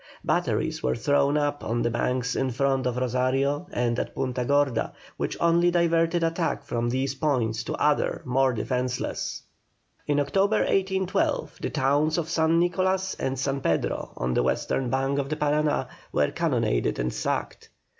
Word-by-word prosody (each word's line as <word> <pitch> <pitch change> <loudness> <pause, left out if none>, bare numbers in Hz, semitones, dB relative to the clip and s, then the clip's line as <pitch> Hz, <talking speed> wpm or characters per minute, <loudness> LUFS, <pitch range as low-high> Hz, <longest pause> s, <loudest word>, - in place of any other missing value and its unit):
Batteries - - 0
were 65 0 0
thrown 145 0 +2
up 145 -1 -1
on 120 +1 -1
the 120 - +1
banks 125 +2 -1
in 135 - 0
front 135 +1 +1
of 125 0 -2
Rosario 130 +5 0
and 120 0 0
at - - -4
Punta 125 -2 -2
Gorda, 140 -3 +1 0.2
which - - -2
only 170 +1 +4
diverted 170 0 +2
attack 165 0 -1
from 120 0 -1
these 130 +2 -1
points 125 -6 0
to - - -3
others 150 -1 +1
more 130 +1 +2
defenceless. 125 +2 -2 0.6
In 145 0 +2
October, 195 +8 +2
1812, 190 -1 0
the - - -1
towns 150 +4 +1
of 165 -2 -2
San 165 0 +2
Nicolas 185 +2 +1
and 135 0 -1
San 135 +1 -1
Pedro, 85 - -1
on 60 +1 -1
the - - +2
western 120 - 0
bank 135 +2 0
of 140 -1 -2
the 155 - -1
Parana, 150 0 +1 0.2
were - - +1
cannonaded - - 0
and 60 +1 -1
sacked. - - -3
140 Hz, 160 wpm, -26 LUFS, 125-160 Hz, 0.6 s, only